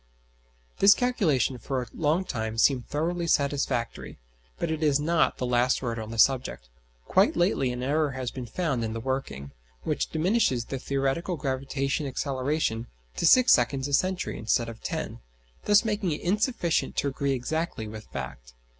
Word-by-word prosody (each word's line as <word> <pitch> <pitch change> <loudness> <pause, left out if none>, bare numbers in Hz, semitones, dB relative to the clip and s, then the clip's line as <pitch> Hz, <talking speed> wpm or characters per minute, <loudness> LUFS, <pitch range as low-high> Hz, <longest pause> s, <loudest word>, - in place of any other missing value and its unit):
This 200 +1 +7
calculation 160 - +1
for 135 +2 -2
a 125 - -3
long 160 +4 +1
time 110 -6 -4
seemed 125 +1 +3
thoroughly 170 +3 -2
satisfactory, 140 -5 -1 0.4
but 160 - -2
it 160 0 -3
is 145 -2 +3
not 160 +2 +1
the 125 - -2
last 125 +1 +2
word 115 -2 -2
on 110 -1 -6
the 115 - -6
subject. 125 - +2 0.4
Quite - - +3
lately 175 -8 +1
an 125 0 -4
error 145 +1 +1
has 130 -2 -4
been 125 -2 -7
found 140 -4 -1
in 110 0 -3
the 115 - -4
working, 125 - -4 0.3
which - - -1
diminishes 160 - +1
the 135 - -5
theoretical 140 +7 -1
gravitation 135 +1 -2
acceleration 130 -3 -1 0.3
to - - +2
six 255 -1 +7
seconds 130 +3 +1
a 145 - -5
century 185 +4 0
instead 115 +1 0
of 115 -1 -10
ten, - - -4 0.5
thus 205 +2 +5
making 205 -6 0
it - - -5
insufficient 200 -2 0
to - - +1
agree 140 0 -1
exactly 135 -2 -3
with 110 0 -9
fact. 65 -2 -8
135 Hz, 165 wpm, -27 LUFS, 120-160 Hz, 0.5 s, This